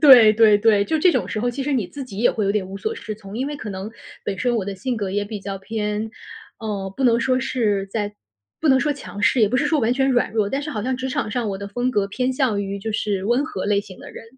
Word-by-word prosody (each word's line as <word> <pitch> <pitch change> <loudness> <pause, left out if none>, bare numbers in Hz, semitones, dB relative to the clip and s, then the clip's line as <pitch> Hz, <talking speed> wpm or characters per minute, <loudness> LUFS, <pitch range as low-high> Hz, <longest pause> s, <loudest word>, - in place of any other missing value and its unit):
对 245 -7 +9
对 215 -1 +6
对。 205 -1 +4
就 320 - 0
这 355 +4 +5
种 - - 0
时 215 - -2
候， 245 +2 +1
其 245 - -6
实 295 - -1
你 235 -9 0
自 280 -2 -7
己 205 -6 -9
也 240 - +4
会 215 - -1
有 200 - +2
点 205 -2 0
无 195 - -6
所 440 - -2
适 215 - -6
从。 205 -1 -9
因 265 +4 -1
为 295 - -5
可 225 - -7
能 195 +1 -5 0.3
本 195 -2 -3
身 245 +2 +1
我 215 -5 0
的 200 -1 -5
性 250 +5 -2
格 200 -3 -2
也 205 +1 -1
比 205 0 -6
较 195 0 -5
偏， 210 +1 -3 0.5
呃， 205 -3 -3
不 - - -2
能 235 -2 +4
说 255 +2 +1
是 220 -7 0
在 205 +1 -3 0.5
不 320 - +1
能 265 -1 +6
说 295 +1 +1
强 270 -7 -9
势， 235 +4 +3
也 215 - +5
不 255 - +1
是 280 - +2
说 300 -1 +2
完 235 +1 +2
全 270 +1 +2
软 250 -2 +2
弱， 215 -2 +1
但 275 +6 -2
是 300 - -4
好 215 -6 -3
像 260 0 0
职 260 +1 -3
场 255 - -1
上 230 0 -2
我 195 -1 -3
的 200 - -6
风 245 +5 -1
格 205 -5 +1
偏 250 +6 -1
向 255 -6 +1
于 200 0 -4
就 215 +2 -4
是 200 -3 -1
温 240 +6 +2
和 200 -12 -4
类 205 0 +2
型 190 -2 -12
的 - - -11
人。 - - -10
220 Hz, 315 characters per minute, -22 LUFS, 200-255 Hz, 0.5 s, 对